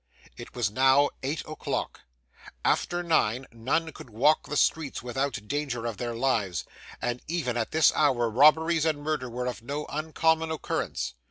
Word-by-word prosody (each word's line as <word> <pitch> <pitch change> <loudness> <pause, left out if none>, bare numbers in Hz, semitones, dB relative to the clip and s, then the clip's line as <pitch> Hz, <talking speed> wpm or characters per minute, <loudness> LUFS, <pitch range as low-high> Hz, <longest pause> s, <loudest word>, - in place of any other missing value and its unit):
It - - -11
was 115 -5 0
now 135 +4 +4
eight 145 +4 -2
o'clock. 155 - -4 0.6
After 175 0 +1
nine, 135 -7 +1
none 140 +8 -1
could 130 - -12
walk 140 +8 +2
the 150 - -2
streets 150 -4 +1
without 125 -3 -3
danger 135 -4 -2
of 115 -3 -3
their 120 -1 -3
lives, 115 -8 0 0.4
and 120 0 -2
even 155 -7 -1
at 115 -2 -1
this 160 0 +4
hour, 130 -6 +2
robberies 155 +7 +4
and 150 -2 0
murder 150 -5 -2
were 125 +1 -4
of 125 -2 -4
no 145 +5 -4
uncommon 160 +1 +1
occurrence. 65 - -3
135 Hz, 160 wpm, -27 LUFS, 120-155 Hz, 0.6 s, now